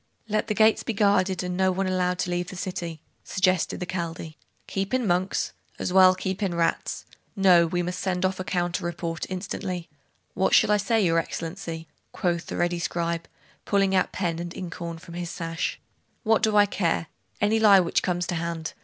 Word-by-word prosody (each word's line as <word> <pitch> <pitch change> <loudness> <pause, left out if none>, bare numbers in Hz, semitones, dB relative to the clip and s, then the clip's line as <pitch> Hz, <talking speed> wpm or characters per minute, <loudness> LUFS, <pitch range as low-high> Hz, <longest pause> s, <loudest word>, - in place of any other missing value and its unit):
'Let 215 0 0
the 210 - -1
gates 220 +1 +4
be 230 - -3
guarded, 195 -3 +2
and 180 0 -3
no 190 0 +3
one 190 +1 -1
allowed 180 -1 0
to 180 - -4
leave 175 0 -1
the - - -8
city,' 175 -4 -5 0.2
suggested 185 -2 +1
the 180 - -3
Chaldee. 170 -3 -5 0.3
'Keep 195 +5 -2
in 255 -2 0
monks? 185 0 0 0.2
as 180 - -3
well 185 -1 +7
keep 190 +2 -3
in 190 -4 0
rats! 165 -1 -1 0.3
No; 180 -4 +5
we 175 +2 -1
must 180 +1 -3
send 185 -1 0
off 185 0 -1
a - - -2
counter 175 0 -1
report, 170 -1 -3
instantly.' 185 -2 -4 0.5
'What 190 - +3
shall - - +5
I 210 - +5
say, 215 0 +2
your 165 -1 +3
Excellency?' 165 0 -5 0.3
quoth 170 -2 -1
the - - -4
ready 175 0 0
scribe, 170 -1 -2 0.4
pulling 195 -1 +2
out 185 -1 +2
pen 170 -3 -2
and 175 0 -6
inkhorn 170 -2 -5
from 170 +1 -12
his 175 0 -4
sash. 165 -1 -3 0.4
'What 220 -1 +3
do 215 -1 +3
I 205 - +7
care? 170 -5 0 0.3
Any 215 +2 +2
lie 205 -3 +7
which 175 -2 +1
comes 180 -1 -1
to 180 - -3
hand. 165 -1 -3
180 Hz, 195 wpm, -26 LUFS, 170-195 Hz, 0.5 s, well